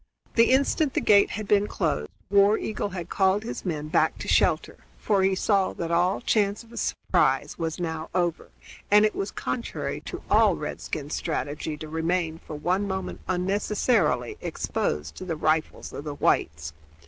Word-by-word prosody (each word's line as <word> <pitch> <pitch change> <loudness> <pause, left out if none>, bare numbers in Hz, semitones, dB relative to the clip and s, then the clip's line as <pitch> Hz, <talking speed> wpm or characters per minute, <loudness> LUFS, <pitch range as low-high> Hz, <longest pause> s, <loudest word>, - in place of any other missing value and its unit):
The 230 0 +5
instant 275 +2 +2
the - - +3
gate 200 -1 +5
had 215 0 -5
been 205 0 +3
closed 150 - -1 0.2
War 200 +2 +5
Eagle 210 -1 -3
had 175 -3 -6
called 190 +3 +2
his 230 - -5
men 155 -5 -3
back 155 - +2
to - - -7
shelter, - - +2 0.2
for 205 -3 +1
he 190 0 +3
saw 195 0 +1
that 170 -1 -4
all 175 +3 +2
chance 210 -2 +1
of 230 - -19
a - - -10
surprise - - 0
was 165 0 -2
now 160 -2 -3
over, 175 -2 0 0.4
and 210 +1 +6
it 215 - +1
was 195 - -3
contrary 235 - -4
to - - -7
all - - +4
redskin 150 -1 -5
strategy 150 -1 -3
to 155 - -7
remain 160 +1 -1
for 155 - -9
one 185 +7 0
moment 190 -1 -4
unnecessarily 185 - +1
exposed 75 +1 -2
to - - -6
the 175 -3 -3
rifles 155 +1 -1
of 145 - -7
the 145 -1 -4
whites. 75 - 0
180 Hz, 170 wpm, -26 LUFS, 155-205 Hz, 0.4 s, and